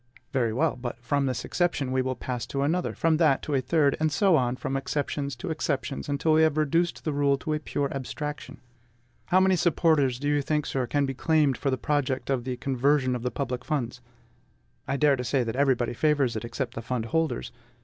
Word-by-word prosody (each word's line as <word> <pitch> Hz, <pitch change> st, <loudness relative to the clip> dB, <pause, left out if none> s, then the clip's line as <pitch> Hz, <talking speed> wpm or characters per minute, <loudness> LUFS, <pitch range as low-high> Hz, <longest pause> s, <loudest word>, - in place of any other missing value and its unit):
Very 120 Hz, -4 st, +1 dB
well; 150 Hz, +6 st, +1 dB
but 120 Hz, -1 st, -6 dB
from 140 Hz, +4 st, 0 dB
this 130 Hz, -2 st, -2 dB
exception 170 Hz, -7 st, 0 dB
we 130 Hz, 0 st, +2 dB
will 130 Hz, 0 st, -2 dB
pass 125 Hz, -1 st, -4 dB
to 140 Hz, +2 st, -2 dB
another, 170 Hz, +5 st, 0 dB
from 165 Hz, -1 st, +2 dB
that 155 Hz, -5 st, +3 dB
to 150 Hz, -, -3 dB
a 135 Hz, -, +2 dB
third, 140 Hz, +2 st, +2 dB
and 155 Hz, 0 st, +1 dB
so 190 Hz, +3 st, +4 dB
on 125 Hz, -3 st, +1 dB
from 135 Hz, -, -4 dB
exceptions 140 Hz, 0 st, -2 dB
to 120 Hz, -, -5 dB
exceptions, 145 Hz, -2 st, -2 dB
until 145 Hz, +3 st, +1 dB
we 155 Hz, -, +5 dB
have 155 Hz, -1 st, +3 dB
reduced 165 Hz, +3 st, +1 dB
the 155 Hz, -, -1 dB
rule 140 Hz, -1 st, +2 dB
to 155 Hz, +3 st, -3 dB
a 150 Hz, -, -1 dB
pure 145 Hz, -1 st, -2 dB
abstraction. 150 Hz, +2 st, -5 dB, 0.7 s
How 185 Hz, 0 st, +4 dB
many 190 Hz, 0 st, +4 dB
supporters 155 Hz, -6 st, +2 dB
do 145 Hz, +3 st, -3 dB
you 145 Hz, 0 st, +2 dB
think, 150 Hz, +1 st, -1 dB
sir, 130 Hz, -2 st, -2 dB
can 145 Hz, +2 st, +1 dB
be 135 Hz, -, -3 dB
claimed 150 Hz, 0 st, +2 dB
for 140 Hz, -, -2 dB
the 130 Hz, -, 0 dB
project 140 Hz, -1 st, -1 dB
of 125 Hz, -3 st, -1 dB
the 130 Hz, -1 st, -3 dB
conversion 135 Hz, 0 st, +1 dB
of 120 Hz, -, -4 dB
the 125 Hz, -, -1 dB
public 125 Hz, +1 st, -3 dB
funds? 125 Hz, -5 st, -3 dB, 0.9 s
I -, -, -1 dB
venture 145 Hz, -1 st, +4 dB
to 125 Hz, -, -3 dB
say 130 Hz, +1 st, +1 dB
that 115 Hz, 0 st, -3 dB
everybody 130 Hz, -4 st, +2 dB
favors 140 Hz, -2 st, +1 dB
it, 110 Hz, -, -3 dB
except 120 Hz, +1 st, -4 dB
the 115 Hz, -, -5 dB
fund 115 Hz, 0 st, -3 dB
holders. 160 Hz, 0 st, -1 dB
140 Hz, 220 wpm, -27 LUFS, 125-150 Hz, 0.9 s, we